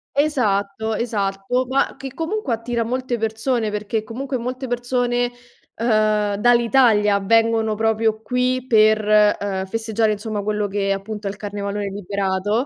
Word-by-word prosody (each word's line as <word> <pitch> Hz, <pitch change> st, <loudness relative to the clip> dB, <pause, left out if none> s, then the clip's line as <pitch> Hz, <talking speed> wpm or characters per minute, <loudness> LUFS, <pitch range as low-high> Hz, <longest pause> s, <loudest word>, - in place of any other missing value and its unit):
Esatto, 220 Hz, -7 st, 0 dB
esatto, 210 Hz, +2 st, -1 dB
ma 270 Hz, 0 st, +1 dB
che 270 Hz, -1 st, -7 dB
comunque 325 Hz, -, -2 dB
attira 230 Hz, +1 st, -2 dB
molte 250 Hz, +1 st, -2 dB
persone, 225 Hz, +1 st, -1 dB
perché 215 Hz, +1 st, -2 dB
comunque 260 Hz, +4 st, -4 dB
molte 255 Hz, +2 st, -4 dB
persone, 245 Hz, 0 st, 0 dB, 0.4 s
ehm, 215 Hz, -3 st, +1 dB
dall'Italia 230 Hz, -2 st, +4 dB
vengono 225 Hz, +1 st, +2 dB
proprio 220 Hz, 0 st, +1 dB
qui 250 Hz, +1 st, 0 dB
per, 215 Hz, -2 st, +4 dB, 0.3 s
ehm, 190 Hz, -1 st, -2 dB
festeggiare, 220 Hz, +1 st, 0 dB
insomma, 210 Hz, 0 st, -3 dB
quello 210 Hz, 0 st, -1 dB
che 195 Hz, 0 st, -1 dB
appunto 205 Hz, +1 st, -4 dB
è -, -, 0 dB
il 200 Hz, -, -7 dB
carnevalone 205 Hz, -1 st, -4 dB
liberato 200 Hz, +4 st, -1 dB
220 Hz, 135 wpm, -21 LUFS, 205-245 Hz, 0.4 s, dall'Italia